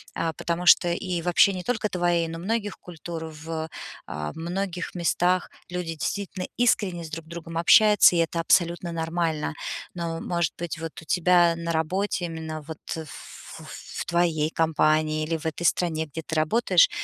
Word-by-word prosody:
а, 165 -1 -1
потому 170 +3 -3
что, 175 0 +7
и 175 0 -2
вообще 180 +3 +4
не 185 - -4
только 220 -2 0
твоей, 175 -2 +1
но 165 0 -6
многих 205 +2 -2
культур 170 -1 -7
в, 160 0 -6 0.4
э, 75 0 -4
многих 180 +2 -4
местах. 175 +1 +1 0.2
Люди 180 0 -2
действительно 190 +3 -3
искренне 200 -7 +2
друг 160 +1 -6
с - - -19
другом 165 -1 -7
общаются, 210 +2 +6
и - - +2
это 165 0 0
абсолютно 170 +1 +2
нормально. 165 -1 -1 0.4
Но 165 -2 -4
может 170 -3 -1
быть, 170 -1 -4
вот 165 -1 -5
у - - -15
тебя 175 0 +4
на 170 0 -3
работе, 180 +4 0
именно 160 -2 -5
вот 155 +1 -8 0.2
ф 160 -3 -9 0.2
в - - -10
в - - -19
твоей 170 -3 +1
компании 155 -1 +2
или 165 +1 -1
в 160 - -12
этой 160 +1 -3
стране, 160 -2 +1
где 150 +3 -6
ты 160 - -5
работаешь, 230 - +4
170 Hz, 170 wpm, -25 LUFS, 160-180 Hz, 0.4 s, что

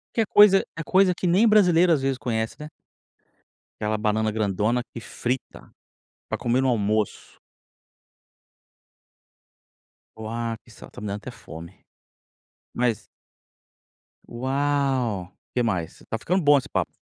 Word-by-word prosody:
Que 230 - +3
é - - +1
coisa 205 -1 +6
é - - -3
coisa 185 +2 +3
que 180 - -3
nem 190 +7 +4
brasileiro, 180 -5 +5
às 150 -5 +3
vezes, 135 -1 0
conhece, 110 -3 -2
né. 150 0 -8 1.1
Aquela 110 0 -1
banana 110 0 0
grandona 110 +3 0
que 115 - -7
frita, 125 +2 -5 0.6
pra - - -3
comer 125 +1 0
no 135 - +1
almoço. 105 -2 -1 2.8
Uau, 115 +1 -4
que 120 - -24
isso, 110 - -13
ó, - - -15
tá - - -12
me 105 - -5
dando 100 +1 -3
até - - -9
fome, 85 +3 -12 0.9
mas 120 -3 -1 1.2
Uau! 130 -6 -1 0.2
Que 125 - +1
mais? 90 -7 -3
Tá 115 - -1
ficando 180 - 0
bom 145 0 +6
esse 135 - -4
papo. - - -1
120 Hz, 135 wpm, -24 LUFS, 110-145 Hz, 2.8 s, coisa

